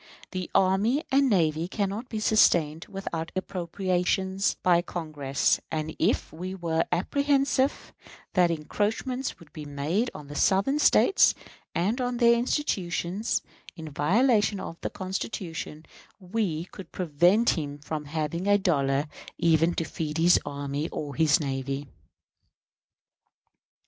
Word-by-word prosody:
The 185 -2 -4
army 200 - +3
and 275 0 +4
navy 165 -5 +2
cannot 205 +5 -3
be 220 - -3
sustained 165 -8 +3
without 175 -5 -5
appropriations 190 +1 -1
by 175 -1 +4
Congress; 155 -6 -1
and, 155 0 -3
if - - +1
we 185 +4 -5
were 165 -3 0
apprehensive 275 +7 +1 0.4
that 180 -2 +4
encroachments 215 - -2
would 155 -3 -18
be 155 - -7
made 150 - -1
on 150 - -8
the 145 - -9
Southern 200 - +2
States 390 +5 +5 0.4
and 215 +9 0
on 245 -1 -1
their 235 -1 +6
institutions, 210 - -1 0.3
in 160 -3 -8
violation 205 - +2
of 165 - -7
the - - -2
Constitution, 185 -4 -5 0.3
we 180 -4 -2
could 180 -1 -12
prevent 180 +7 +3
him 145 -4 -4
from 150 +1 -5
having 160 +4 -3
a 205 0 +5
dollar 140 -7 +1 0.3
even 165 +1 +3
to - - 0
feed 155 -1 -4
his 170 +2 +5
army 145 +2 -4
or 145 -2 -5
his 160 -1 +3
navy. 135 -1 -3
175 Hz, 125 wpm, -27 LUFS, 155-205 Hz, 0.4 s, their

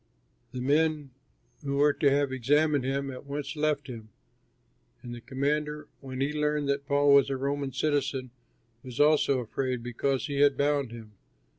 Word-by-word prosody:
The 125 - -5
men 150 +1 +1 0.5
who 140 -1 -2
were 145 +1 +4
to 145 -1 +2
have 140 0 +1
examined 145 +3 +2
him, 135 +1 -2
at 130 - -9
once 145 +2 -4
left 150 -1 0
him. 115 -5 -9 0.9
And 120 -1 -7
the 120 - -8
commander, 150 +3 -2
when 130 -1 -6
he 140 +2 0
learned 150 -1 0
that 140 0 -1
Paul 145 0 +4
was 140 -1 +5
a 135 - -1
Roman 140 +1 -2
citizen, 135 -2 -1 0.5
was 125 -3 -9
also 145 -3 +4
afraid 125 +1 -3
because 125 +2 -1
he 140 -2 -3
had 145 -2 +4
bound 140 -3 +1
him. 115 -2 -10
140 Hz, 165 wpm, -28 LUFS, 130-145 Hz, 0.9 s, was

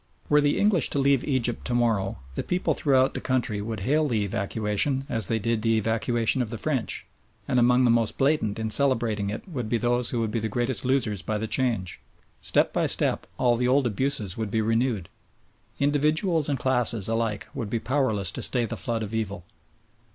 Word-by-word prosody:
Were 150 0 +5
the 145 0 +1
English 200 -7 +2
to - - -3
leave 140 -2 +2
Egypt 125 -4 0
to 120 - -1
morrow 115 -5 0 0.2
the - - -3
people 180 +1 -1
throughout 135 -2 +2
the - - -5
country 120 -5 -1
would 110 -1 -5
hail 150 +8 +1
the 110 -6 0
evacuation 110 +6 -1
as 115 -6 0
they 115 - 0
did 115 +1 -1
the 115 0 +2
evacuation 115 +3 0
of 120 - -3
the 115 - -5
French, 135 -1 -2 0.4
and 125 - +2
among 125 +1 +4
the 120 - +4
most 115 -2 +1
blatant 135 -7 +1
in 110 -1 -3
celebrating 115 -6 +2
it 105 - -6
would 125 - -5
be 120 - +1
those 120 +1 +1
who 120 - -1
would 110 -2 -1
be 115 - -1
the 110 0 -3
greatest 120 +2 0
losers 125 -7 0
by 105 +6 -2
the 110 - -3
change. 110 -7 -1 0.4
Step - - +2
by - - +1
step - - +2
all 120 -2 +2
the 125 +1 0
old 135 +1 +3
abuses 115 -4 -1
would 110 -2 -3
be 110 - 0
renewed. 115 -3 0 0.7
Individuals 150 +3 +1
and 140 - 0
classes 120 -5 +2
alike 115 -2 -2
would 110 -4 -5
be 115 - -1
powerless 110 -8 0
to - - -5
stay 125 -2 +3
the - - -5
flood 115 -2 -2
of 105 +1 -7
evil. 100 -5 -3
120 Hz, 205 wpm, -25 LUFS, 110-130 Hz, 0.7 s, Were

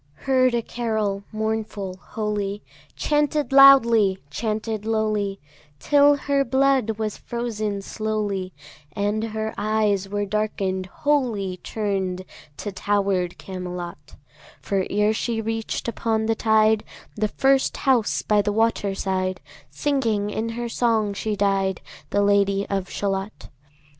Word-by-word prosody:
Heard 255 -2 +3
a 235 - 0
carol, 215 -5 -2
mournful, 215 -3 -3
holy, 210 -2 -3 0.3
Chanted 295 -1 0
loudly, 235 -8 +7
chanted 215 +2 -2
lowly, 215 -3 -1 0.4
Till 290 - +5
her 280 0 +1
blood 265 -4 +2
was 215 -2 -3
frozen 215 -4 -3
slowly, 205 -3 -2 0.4
And 205 +3 -1
her 220 0 -3
eyes 210 -2 +1
were 205 0 -1
darken'd 195 -2 -2
wholly, 225 -8 0
Turn'd 190 -2 -3 0.3
to 205 - -5
tower'd 195 -3 0
Camelot; 180 -5 -7 0.4
For 195 -2 -1
ere 210 +1 +2
she 225 +1 -2
reach'd 225 +1 -3
upon 225 -1 -1
the 225 - +2
tide 220 -1 +3 0.3
The 215 0 0
first 270 +4 +2
house 250 -5 +2
by 210 -1 +3
the 205 +1 -1
water 210 -2 +1
side, 185 -1 -1 0.3
Singing 225 -8 0
in 220 +2 -2
her 240 0 -2
song 225 -3 +1
she 210 +1 -2
died, 195 -2 +1 0.3
The 205 - +2
Lady 200 0 +2
of 195 -1 -1
Shalott. 195 +1 -3
215 Hz, 125 wpm, -23 LUFS, 200-225 Hz, 0.4 s, loudly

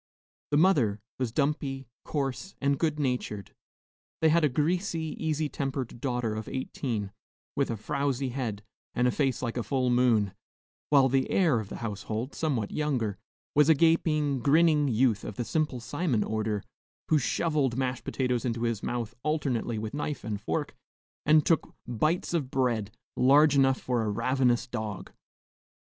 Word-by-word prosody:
The 145 - +2
mother 140 - +3 0.2
was 125 -3 -1
dumpy, 140 -1 -1 0.2
coarse, 140 +5 -3
and 140 0 +1
good 155 -2 0
natured. 125 -7 -2 0.7
They 160 - +4
had 165 +1 +3
a 150 - +4
greasy, 160 +3 -1
easy 155 -1 0
tempered 135 -4 -4
daughter 125 -4 -1
of 110 0 -5
eighteen, 115 -6 -3 0.4
with 140 - +1
a 115 - -2
frowsy 135 +4 -1
head, 120 -5 -4 0.3
and 125 +1 +3
a - - +3
face 135 -3 0
like 120 0 -2
a - - +1
full 130 0 0
moon; 115 -5 +3 0.6
while 140 -2 +6
the 135 0 +1
heir 160 -11 +3
of 105 -3 -6
the - - -6
household, 110 +4 -4
somewhat 130 -10 -1
younger, 125 -10 -1 0.3
was 150 +1 +5
a 160 - +7
gaping, 155 -3 +2
grinning 150 +3 +4
youth 115 -3 +2
of 105 - -6
the 120 - -3
Simple 150 -4 -1
Simon 140 -2 -1
order, 110 -2 -2 0.5
who 155 - +4
shovelled 140 -3 0
mashed 130 -1 -1
potatoes 125 -3 -1
into 120 -1 -2
his 115 -3 -1
mouth 120 -2 -3
alternately 135 -6 -1
with 110 +2 -4
knife 145 0 -3
and 105 -2 -4
fork, - - -2 0.5
and 155 -1 +5
took 165 - +1
bites 155 +10 0
of 150 -7 0
bread 120 -6 0 0.3
large 145 +3 +5
enough 135 -1 +4
for 125 -2 -1
a 110 - -1
ravenous 125 +3 +1
dog. 110 -5 -5
130 Hz, 160 wpm, -28 LUFS, 115-150 Hz, 0.7 s, a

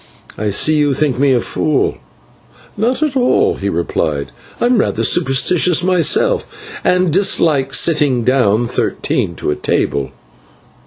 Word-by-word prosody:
I 105 0 -3
see 155 +10 +2
you 145 -2 +1
think 140 -4 -1
me 140 0 +3
a 125 - +3
fool." 145 - -1 0.8
"Not 245 +8 -1
at 295 -3 -2
all," 250 -1 +1
he 100 - -3
replied; 75 -5 -2 0.3
"I - - 0
am 245 -2 +2
rather - - -1
superstitious 170 +3 +2
myself 425 - 0
and 180 -3 +1
dislike 155 -7 +2
sitting 145 -8 +2
down 120 -3 +1
thirteen - - -2
to 75 - -2
table." 70 -1 -2
150 Hz, 135 wpm, -15 LUFS, 120-185 Hz, 0.8 s, me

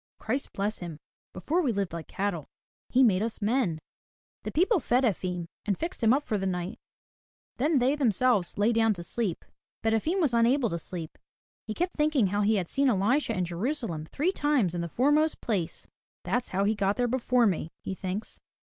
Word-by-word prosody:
Christ 260 +5 -2
bless 205 +2 -2
him! 170 -4 -6 0.3
Before, 310 - 0
we 275 -8 +1
lived 195 -5 -2
like 170 -1 -6
cattle. 190 -6 -3 0.4
He 260 +1 +4
made 200 -6 +4
us 225 +1 -3
men.*' 210 -6 +1 0.6
The - - -5
people 375 +5 +3
fed 250 -1 +2
Efim, 180 -6 -1 0.2
and 200 -3 -1
fixed 340 -1 -4
him 225 - +5
up 275 +3 +3
for 215 -6 -1
the 195 - -1
night, 180 0 -3 0.8
then 295 +4 +2
they 260 +3 +3
themselves 240 -7 +2
lay 210 +3 +3
down 225 -2 +3
to 175 - -7
sleep. 195 -1 -3 0.4
But 225 0 +2
Efim 315 - +1
was 300 -9 +2
unable 235 +1 +3
to 170 - -2
sleep. 165 -2 -7 0.5
He 215 - -3
kept 355 +1 -2
thinking 300 -6 +3
how 205 +2 0
he 215 +2 +3
had 185 -4 -1
seen 275 +5 +2
Elisha 230 +3 +1
in 180 - +1
Jerusalem 175 - -3
three 310 - 0
times 290 - +1
in 175 - -2
the 170 - -4
foremost 295 - +2
place. 195 -9 -3 0.4
That's 245 0 -1
how 195 +2 0
he 210 +2 +2
got 200 -1 0
there 245 -1 +2
before 250 0 +2
me," 180 -6 0
he - - -3
thinks. 190 +3 -5
220 Hz, 195 wpm, -28 LUFS, 185-265 Hz, 0.8 s, him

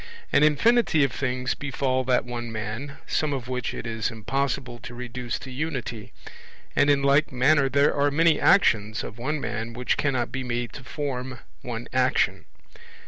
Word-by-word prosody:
An - - +5
infinity 155 +3 +4
of 135 - +1
things 125 0 -1
befall 130 -2 -1
that 125 -1 +2
one 120 -1 -5
man, 115 +6 -5
some 150 -2 0
of 130 -3 -4
which 125 -2 -2
it - - -6
is 110 -2 -2
impossible 120 +1 -2
to 120 0 -9
reduce 125 0 -4
to 135 - -9
unity; 125 -6 -4 0.6
and 145 - +4
in 140 -1 +3
like 140 +2 +3
manner 135 +2 +3
there 140 +2 +3
are 145 0 +2
many 160 +2 +3
actions 110 - +3
of 110 - -8
one 150 +5 -1
man 115 -3 -4
which 125 +1 -1
cannot 130 -4 0
be 135 -1 -3
made 120 -2 -3
to 135 - -9
form 130 -2 -4 0.2
one 120 -1 -5
action. 130 0 +1
130 Hz, 170 wpm, -25 LUFS, 120-140 Hz, 0.6 s, An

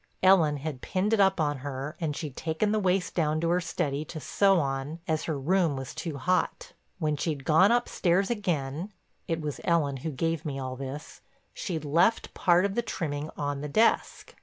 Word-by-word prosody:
Ellen 170 -6 +5
had 140 -2 -5
pinned 200 +3 0
it 225 - +3
up 195 -2 +4
on 145 -2 +1
her 140 +2 -5
and 150 -3 -1
she'd 145 -4 -5
taken 165 +6 -1
the 215 - +2
waist 185 -1 +1
down 155 -2 +1
to 165 - +1
her 180 +1 +2
study 150 -3 -2
to 155 - -7
sew 195 +4 +3
on 135 +1 -2
as 160 -2 0
her 155 -3 -2
room 165 +2 +2
was 135 -1 -6
too 155 -2 -5
hot. 180 +7 -1 0.2
When 155 -4 0
she'd 145 -2 -3
gone 175 +7 +5
upstairs 195 -5 +1
again—it 170 - -4
was 150 -3 -4
Ellen 150 -5 +1
who 145 +5 -4
gave 165 +2 -1
me 140 -3 -4
all 130 -1 -4
this—she'd 150 - -7
left 170 +10 +2
part 180 +1 +3
of 200 - -1
the 240 - +1
trimming 155 -9 -3
on 145 -1 -2
the 150 - -4
desk. 220 +10 +1
160 Hz, 185 wpm, -28 LUFS, 145-185 Hz, 0.2 s, Ellen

